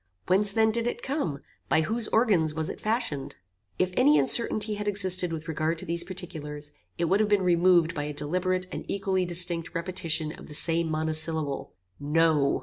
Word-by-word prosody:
Whence 195 +2 +3
then 220 +1 +2
did 235 +1 -2
it 240 - -5
come? 260 - -3 0.3
By 160 - +3
whose 225 +8 0
organs 185 -10 +1
was 160 -1 -3
it - - -8
fashioned? 215 - -3 0.4
"If 185 0 0
any 290 +4 +4
uncertainty 215 -2 +3
had 210 0 -5
existed 185 -3 +3
with 160 -1 -6
regard 160 +1 -2
to - - -7
these 170 +1 -1
particulars, 150 -5 -7 0.3
it - - 0
would 190 +5 +1
have 215 -1 +1
been 205 -2 +2
removed 175 -1 +3
by 145 -3 -4
a 150 - -5
deliberate 180 +5 -1
and - - -6
equally 190 -2 -1
distinct 175 -1 0
repetition 165 -3 -1
of - - -12
the 150 - -4
same 165 +1 +4
monosyllable, 155 - 0 0.2
"No." 150 -1 +1
170 Hz, 180 wpm, -26 LUFS, 160-200 Hz, 0.4 s, any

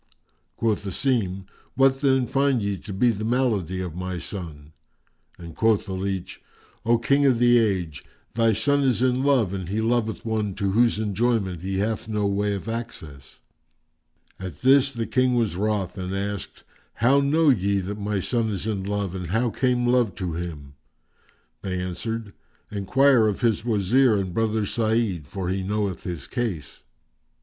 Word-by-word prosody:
Quoth 110 -3 0
Asim, 100 -3 -1 0.3
"What 135 0 +3
then 135 -3 +3
find 135 0 +1
ye 100 0 -1
to 100 - -9
be 120 +5 +3
the 110 -1 -5
malady 110 -7 0
of 90 -4 -5
my 90 0 -4
son?"; 80 -5 -8 0.6
and 85 -2 -10
quoth 110 -2 +2
the 95 - -5
leach, 95 -1 -4 0.5
"O 120 0 +5
King 140 +4 +2
of 130 -3 +3
the 120 0 +5
Age, 90 - -1 0.3
thy 115 -1 +3
son 140 +7 +2
is 125 -4 +1
in 130 0 +2
love 130 -9 +2
and 95 -3 -4
he 105 +3 -1
loveth 115 -1 0
one 105 -3 -1
to 100 -2 -1
whose 115 +2 +3
enjoyment 105 -4 0
he 95 +1 -3
hath 110 +3 -2
no 105 -2 -1
way 100 +1 0
of 100 - -7
access." 80 - -7 1.0
At 95 -6 -7
this 135 +1 +5
the 115 -3 -3
King 130 0 +2
was 115 -7 0
wroth 100 -1 -1
and 95 +1 -3
asked, 100 0 -5 0.3
"How 130 +5 +4
know 150 +3 +3
ye 100 -5 +2
that 100 +3 -5
my 100 -1 -1
son 115 +3 0
is 100 -1 -3
in 105 -4 -2
love 100 -2 -2
and 90 -2 -5
how 110 +6 0
came 125 0 +1
love 120 -4 +2
to 90 -3 -3
him?"; 80 -5 -6 0.9
they 90 -2 -3
answered, 100 +4 -4 0.4
"Enquire 115 +4 +3
of 105 - -2
his 115 -3 +1
Wazir 115 +2 +3
and 95 -3 -3
brother 110 0 0
Sa'id, 110 - 0
for 95 +1 -4
he 95 +1 -1
knoweth 100 -1 -2
his 85 -6 -5
case." 110 - -4
105 Hz, 170 wpm, -24 LUFS, 95-120 Hz, 1.0 s, O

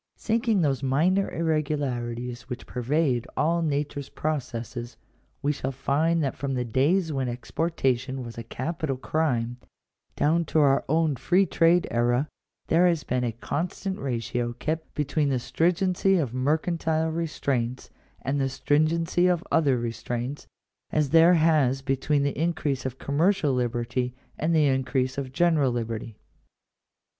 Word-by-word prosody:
Sinking 225 -3 +1
those 135 -3 +1
minor 165 +9 +2
irregularities 130 -7 -2
which 125 - -6
pervade 125 -1 0
all 170 +3 +2
nature's 145 -2 -2
processes, 120 -5 -4 0.5
we 145 - +2
shall 135 -2 -3
find 155 +5 +1
that 135 - -1
from 135 -1 -3
the 125 -1 -1
days 155 - +1
when 135 -2 -1
ex 120 +1 -8
portation 135 -5 0
was 115 -1 -8
a 115 - -5
capital 135 +4 -3
crime, 125 -5 -1 0.6
down 165 +3 +2
to 160 - -2
our 140 -3 +4
own 160 -1 +2
free 175 +10 +3
trade 170 0 +3
era, 120 +4 +1 0.4
there 175 +3 +4
has 170 -3 +1
been 125 0 -1
a 120 - 0
constant 175 - -3
ratio 120 -2 -2
kept 155 +6 -4
between 150 0 0
the 135 - +1
stringency 180 - +1
of 135 -9 -1
mercantile 160 +4 0
restraints 140 -7 -2 0.3
and 140 +1 0
the 135 - +1
stringency 165 +6 +2
of 175 -1 +1
other 145 -6 +3
restraints, 120 +3 -4 0.4
as 150 -3 0
there 165 +2 +7
has 150 -5 +3
between 140 +1 +1
the 140 - -1
increase 150 -6 -1
of 130 0 -7
commercial 155 +2 +1
liberty 125 0 -1 0.2
and 165 +2 +1
the 155 -2 +4
increase 130 -1 0
of 130 -2 -5
general 155 -3 +3
liberty. 115 -2 -4
140 Hz, 140 wpm, -26 LUFS, 125-160 Hz, 0.6 s, there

